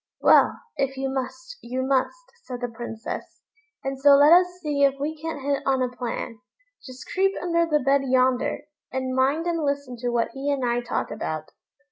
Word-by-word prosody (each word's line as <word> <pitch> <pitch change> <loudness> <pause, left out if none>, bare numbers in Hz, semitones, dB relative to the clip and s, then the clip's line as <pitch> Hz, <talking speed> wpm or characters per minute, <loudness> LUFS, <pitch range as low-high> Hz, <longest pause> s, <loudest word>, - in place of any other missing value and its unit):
"Well, - - +5 0.2
if 270 -1 -1
you 270 0 -2
must, - - -5
you 255 +2 -3
must," 265 - +1 0.3
said 250 -2 -6
the 245 - -2
Princess; 225 -1 -7 0.4
"and 270 0 -3
so 280 +1 +7
let 290 +3 +7
us 360 +1 +6
see 295 -4 0
if 275 -1 +4
we 300 +3 -2
can't 315 -2 -6
hit 280 0 0
on 265 -1 +1
a 250 0 -3
plan. 235 -2 -4 0.4
Just 255 -1 -11
creep 390 +1 +2
under 335 -1 +1
the 300 -3 +1
bed 275 0 +4
yonder, 255 0 +2 0.3
and 260 0 -2
mind 275 +6 +2
and 335 -2 -1
listen 280 -3 -2
to 245 +1 -2
what 235 -1 0
he 275 +1 -2
and 270 -3 0
I 240 0 +1
talk 240 - -3
about. 155 0 -4
270 Hz, 190 wpm, -24 LUFS, 255-295 Hz, 0.4 s, so